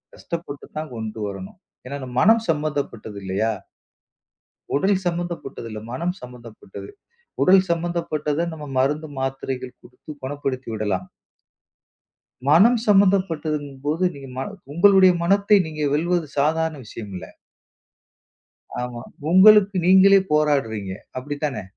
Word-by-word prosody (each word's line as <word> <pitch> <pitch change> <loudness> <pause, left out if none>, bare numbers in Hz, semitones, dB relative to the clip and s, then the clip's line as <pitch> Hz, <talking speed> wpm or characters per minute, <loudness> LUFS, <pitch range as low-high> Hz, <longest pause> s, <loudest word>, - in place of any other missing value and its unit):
கஷ்டப்பட்டுதான் 155 - -7
கொண்டு 110 -1 -6
வரணும். 95 - -8 0.3
ஏன்னா, 140 +3 -5
நம் 125 -1 -7
மனம் 225 +2 +5
சம்பந்தப்பட்டது 145 -9 -2
இல்லையா? 95 +4 0 1.2
உடல் 190 +6 +2
சம்பந்தப்பட்டது 170 -8 -4
இல்ல, 110 -1 -6
மனம் 170 +8 -2
சம்பந்தப்பட்டது. 120 - -11 0.6
உடல் 185 0 +6
சமந்தப்பட்டத 165 -3 -1
நம்ம, 150 -2 -8
மருந்து 145 +4 0
மாத்திரைகள் 130 -1 -4
குடுத்து - - -16
குணப்படுத்திவிடலாம். 130 -8 -3 1.4
மனம் 205 +11 +6
சம்பந்தப்பட்டதுங்கபோது, 160 -6 +1
நீங்க 135 -1 -10
ம 135 - -2 0.3
உங்களுடைய 190 +2 +6
மனத்தை 200 +3 +4
நீங்க 155 -1 -6
வெல்வது 170 +1 0
சாதாரண 160 +2 +1
விஷயம் 105 -1 -9
இல்ல. 90 -2 -7 1.6
ஆமா. 125 -1 -5 0.3
உங்களுக்கு 200 +2 +7
நீங்களே 190 +2 +7
போராடுறீங்க, 135 -10 +1 0.3
அப்டிதான? 145 -2 -4
150 Hz, 100 wpm, -22 LUFS, 125-175 Hz, 1.6 s, உங்களுக்கு